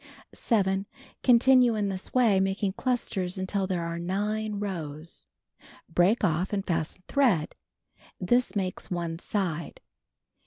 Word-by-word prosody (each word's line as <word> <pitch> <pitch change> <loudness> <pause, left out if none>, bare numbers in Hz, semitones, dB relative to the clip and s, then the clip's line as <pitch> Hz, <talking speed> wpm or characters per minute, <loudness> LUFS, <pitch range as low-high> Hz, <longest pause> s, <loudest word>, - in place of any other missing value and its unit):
(See - - -20
picture.) - - -18
7. 195 -4 +1 0.4
Continue 250 -1 +5
in 205 -2 0
this 190 -1 -5
way, 230 -7 +4
making 195 +1 0
clusters 205 -7 -2
until 190 +1 -1
there 180 -3 -1
are 170 0 -4
9 210 +4 -2
rows. 165 -5 -5 0.6
Break 180 +8 +2
off 175 0 +1
and 200 -1 -1
fasten 165 +1 -2
thread. 230 - +2 0.7
This 240 +7 +1
makes 185 -2 -2
one 170 -2 -3
side. 175 -6 -3
190 Hz, 130 wpm, -27 LUFS, 175-215 Hz, 0.7 s, Continue